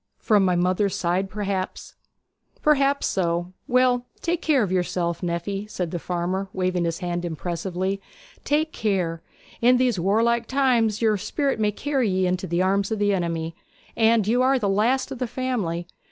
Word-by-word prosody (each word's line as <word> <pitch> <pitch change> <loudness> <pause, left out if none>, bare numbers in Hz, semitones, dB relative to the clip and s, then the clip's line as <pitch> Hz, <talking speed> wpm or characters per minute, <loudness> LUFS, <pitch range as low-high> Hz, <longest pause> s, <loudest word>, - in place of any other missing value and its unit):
'From 210 -3 +3
my 180 -1 +2
mother's 185 +3 +1
side, 185 +3 0
perhaps.' 195 -1 -4 0.7
'Perhaps 280 -2 +3
so. 175 -1 -1
Well, 250 0 +2
take 340 0 -1
care 285 -6 +3
of 190 - -2
yourself, 175 -2 -1
nephy,' 190 +4 -3
said 180 -5 -3
the 175 - -3
farmer, 180 +3 -2
waving 185 -2 0
his 165 -1 -1
hand 175 -1 -3
impressively. 180 +3 -3 0.4
'Take 310 +2 0
care! 185 - -1 0.4
In 250 +2 +5
these 245 -6 +1
warlike 230 +5 +2
times 240 -5 +2
your 215 -2 +3
spirit 275 +6 -1
may 210 -1 +2
carry 265 +1 0
ye 185 0 +1
into 180 0 -1
the 170 +2 +1
arms 195 +1 +1
of 220 - -1
the 205 0 +2
enemy; 165 -3 -2 0.4
and 225 -2 +3
you 240 +3 +3
are 265 +1 +4
the 215 -5 -1
last 230 +8 +1
of 265 - -6
the 250 - -1
family. 220 -10 -2
195 Hz, 170 wpm, -24 LUFS, 180-240 Hz, 0.7 s, In